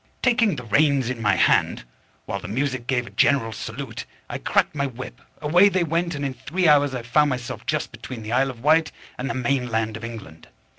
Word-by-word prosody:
_ -, -, -39 dB
Taking 230 Hz, -7 st, +3 dB
the 125 Hz, -, -7 dB
reins 130 Hz, +2 st, +2 dB
in 120 Hz, -3 st, -6 dB
my 105 Hz, -2 st, +3 dB
hand, -, -, +2 dB, 0.4 s
while 100 Hz, -, -3 dB
the 90 Hz, -, -8 dB
music 130 Hz, +2 st, -2 dB
gave 125 Hz, -2 st, 0 dB
a -, -, -11 dB
general 130 Hz, -6 st, +2 dB
salute, 115 Hz, +2 st, -6 dB, 0.3 s
I -, -, -4 dB
cracked -, -, +1 dB
my 140 Hz, -1 st, -1 dB
whip, 130 Hz, 0 st, -9 dB, 0.2 s
away 175 Hz, +7 st, +5 dB
they 185 Hz, -2 st, +1 dB
went, 170 Hz, +1 st, -1 dB
and 145 Hz, 0 st, -3 dB
in 135 Hz, -, -2 dB
three 165 Hz, +8 st, -1 dB
hours 145 Hz, -3 st, +4 dB
I 125 Hz, -, -4 dB
found 145 Hz, +5 st, +3 dB
myself 125 Hz, -3 st, -5 dB
just -, -, -1 dB
between 120 Hz, -4 st, -8 dB
the 110 Hz, -, -6 dB
Isle 135 Hz, +2 st, +2 dB
of 120 Hz, -2 st, -9 dB
Wight 160 Hz, +2 st, +4 dB, 0.3 s
and 130 Hz, +2 st, -3 dB
the -, -, -2 dB
main 125 Hz, 0 st, 0 dB
land 110 Hz, -1 st, -1 dB
of 110 Hz, -, -8 dB
England. 110 Hz, -9 st, -9 dB
130 Hz, 225 wpm, -23 LUFS, 115-150 Hz, 0.4 s, away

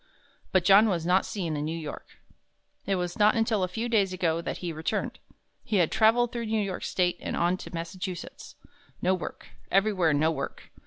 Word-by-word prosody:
But 185 Hz, -2 st, +2 dB
John 205 Hz, +3 st, +7 dB
was 170 Hz, -4 st, -1 dB
not 180 Hz, +2 st, +3 dB
seen 170 Hz, -7 st, -3 dB
in 145 Hz, -, -2 dB
New 160 Hz, +2 st, -3 dB
York. 155 Hz, -3 st, -8 dB, 0.7 s
It 195 Hz, -, +2 dB
was 180 Hz, +1 st, -3 dB
not 210 Hz, +1 st, +5 dB
until 225 Hz, -2 st, +1 dB
a 185 Hz, -, +1 dB
few 225 Hz, +6 st, -3 dB
days 205 Hz, -5 st, +2 dB
ago 170 Hz, -3 st, 0 dB
that -, -, -4 dB
he 175 Hz, -2 st, -4 dB
returned. 160 Hz, +1 st, -3 dB, 0.4 s
He 215 Hz, -, -2 dB
had 175 Hz, -5 st, +3 dB
traveled 230 Hz, +2 st, +4 dB
through 235 Hz, -2 st, -4 dB
New 220 Hz, -1 st, +1 dB
York 190 Hz, -2 st, -5 dB
State 180 Hz, -1 st, 0 dB
and -, -, -4 dB
on 175 Hz, +2 st, +2 dB
to -, -, -9 dB
Massachusetts. 175 Hz, +1 st, -6 dB, 0.5 s
No 185 Hz, -, +3 dB
work 185 Hz, -, -6 dB, 0.2 s
everywhere 195 Hz, -4 st, +3 dB
no 155 Hz, +2 st, +2 dB
work! 140 Hz, -4 st, -6 dB
185 Hz, 195 wpm, -27 LUFS, 170-210 Hz, 0.7 s, John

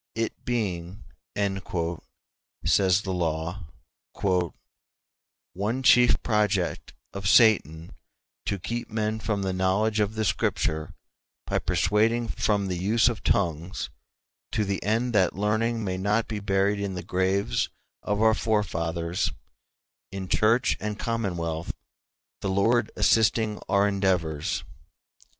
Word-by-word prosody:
"It 115 Hz, 0 st, -3 dB
being," 100 Hz, -5 st, -3 dB, 1.6 s
says 95 Hz, +3 st, +3 dB
the 95 Hz, -, -3 dB
law, 85 Hz, +2 st, -2 dB, 1.9 s
"one 110 Hz, +8 st, -2 dB
chief 125 Hz, -3 st, +5 dB
project 105 Hz, -5 st, 0 dB, 0.2 s
of 100 Hz, -1 st, -4 dB
Satan 85 Hz, -, +4 dB, 0.6 s
to 100 Hz, -, 0 dB
keep 120 Hz, +6 st, -4 dB
men 110 Hz, 0 st, -1 dB
from 105 Hz, -2 st, -2 dB
the 95 Hz, -1 st, -1 dB
knowledge 100 Hz, +4 st, +1 dB
of 105 Hz, +1 st, 0 dB
the 110 Hz, 0 st, 0 dB
Scripture 80 Hz, -5 st, -1 dB, 0.5 s
by -, -, 0 dB
persuading 115 Hz, +2 st, +1 dB
from 105 Hz, -2 st, 0 dB
the 90 Hz, -2 st, -3 dB
use 110 Hz, +5 st, +3 dB
of 115 Hz, -, -5 dB
tongues, 85 Hz, +1 st, -1 dB, 0.6 s
to 105 Hz, -, +1 dB
the 100 Hz, -1 st, -2 dB
end 115 Hz, +4 st, 0 dB
that 95 Hz, -4 st, +3 dB
learning 110 Hz, +3 st, 0 dB
may 95 Hz, -2 st, -2 dB
not 105 Hz, +4 st, +1 dB
be 110 Hz, -2 st, -3 dB
buried 100 Hz, +1 st, +1 dB
in 100 Hz, -2 st, -3 dB
the 90 Hz, -, -5 dB
graves 95 Hz, +2 st, 0 dB, 0.3 s
of 105 Hz, +1 st, 0 dB
our 110 Hz, 0 st, +6 dB
forefathers, 85 Hz, -6 st, -1 dB, 0.8 s
in 95 Hz, -1 st, -5 dB
church 115 Hz, +4 st, +3 dB
and 105 Hz, -1 st, -4 dB
commonwealth, 85 Hz, -9 st, -2 dB, 0.7 s
the 100 Hz, -, -2 dB
Lord 110 Hz, +4 st, +2 dB
assisting 110 Hz, -2 st, +2 dB
our 100 Hz, 0 st, +4 dB
endeavors. 90 Hz, -7 st, 0 dB
100 Hz, 120 wpm, -26 LUFS, 95-110 Hz, 1.9 s, our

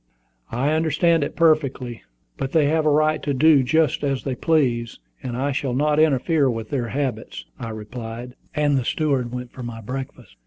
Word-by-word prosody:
"I 130 Hz, +6 st, 0 dB
understand 160 Hz, +1 st, +2 dB
it -, -, -4 dB
perfectly; 140 Hz, -7 st, +1 dB, 0.3 s
but 135 Hz, 0 st, -4 dB
they 160 Hz, -3 st, +4 dB
have 155 Hz, +1 st, +2 dB
a -, -, +6 dB
right 155 Hz, +1 st, +2 dB
to 145 Hz, -2 st, -1 dB
do 150 Hz, +1 st, +5 dB
just 155 Hz, +3 st, +1 dB
as 135 Hz, -2 st, -1 dB
they 135 Hz, -, -2 dB
please, 125 Hz, -5 st, 0 dB, 0.2 s
and 120 Hz, -1 st, -4 dB
I 140 Hz, +3 st, 0 dB
shall 130 Hz, -2 st, -2 dB
not 150 Hz, +2 st, +2 dB
interfere 155 Hz, -1 st, +3 dB
with 115 Hz, -2 st, -4 dB
their 125 Hz, -4 st, -1 dB
habits," 125 Hz, -1 st, -3 dB
I 115 Hz, -2 st, -5 dB
replied; 115 Hz, +2 st, -7 dB, 0.2 s
and 145 Hz, -2 st, +2 dB
the -, -, -2 dB
steward 135 Hz, -3 st, 0 dB
went 125 Hz, -1 st, -6 dB
for 130 Hz, -, -10 dB
my 120 Hz, -2 st, -6 dB
breakfast. 130 Hz, -1 st, -7 dB
135 Hz, 185 wpm, -22 LUFS, 120-150 Hz, 0.3 s, a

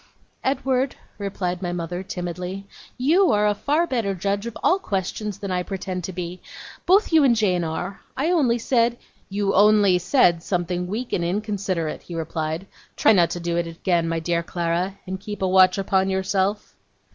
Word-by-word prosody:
'Edward,' 265 Hz, -1 st, 0 dB, 0.2 s
replied 185 Hz, -3 st, -3 dB
my 175 Hz, -2 st, -2 dB
mother, 175 Hz, +1 st, -4 dB
timidly, 180 Hz, 0 st, -5 dB, 0.3 s
'you 330 Hz, +9 st, +4 dB
are 210 Hz, -1 st, +3 dB
a 210 Hz, -, +3 dB
far 295 Hz, +10 st, +1 dB
better 230 Hz, -, -1 dB
judge 200 Hz, +4 st, -2 dB
of 235 Hz, -, -6 dB
all 375 Hz, -, +4 dB
questions 200 Hz, -, -3 dB
than 200 Hz, -2 st, -5 dB
I 180 Hz, 0 st, 0 dB
pretend 185 Hz, -1 st, -4 dB
to -, -, -5 dB
be. 180 Hz, 0 st, -6 dB, 0.5 s
Both 385 Hz, -1 st, +4 dB
you 315 Hz, -2 st, +6 dB
and 250 Hz, -4 st, +5 dB
Jane 185 Hz, -5 st, +1 dB
are. 170 Hz, +4 st, -4 dB, 0.2 s
I 305 Hz, +6 st, +1 dB
only 265 Hz, -9 st, +3 dB
said 235 Hz, 0 st, +1 dB, 0.2 s
' -, -, -36 dB
'You 200 Hz, 0 st, 0 dB
only 205 Hz, -2 st, +5 dB
said 180 Hz, -3 st, +3 dB
something 180 Hz, 0 st, -2 dB
weak 230 Hz, +6 st, -4 dB
and 175 Hz, -, +1 dB
inconsiderate,' 190 Hz, -3 st, -2 dB
he 175 Hz, -, -9 dB
replied. 160 Hz, +1 st, -3 dB, 0.3 s
'Try -, -, +5 dB
not 175 Hz, -4 st, +4 dB
to 175 Hz, -, -4 dB
do 170 Hz, 0 st, -2 dB
it 170 Hz, 0 st, 0 dB
again, 165 Hz, 0 st, 0 dB
my 165 Hz, 0 st, -1 dB
dear 170 Hz, +1 st, 0 dB
Clara, 175 Hz, +3 st, -2 dB
and 190 Hz, 0 st, -5 dB
keep 205 Hz, 0 st, -6 dB
a -, -, +2 dB
watch 185 Hz, 0 st, +5 dB
upon 190 Hz, -1 st, +1 dB
yourself. 190 Hz, +2 st, -1 dB
190 Hz, 180 wpm, -23 LUFS, 175-215 Hz, 0.5 s, you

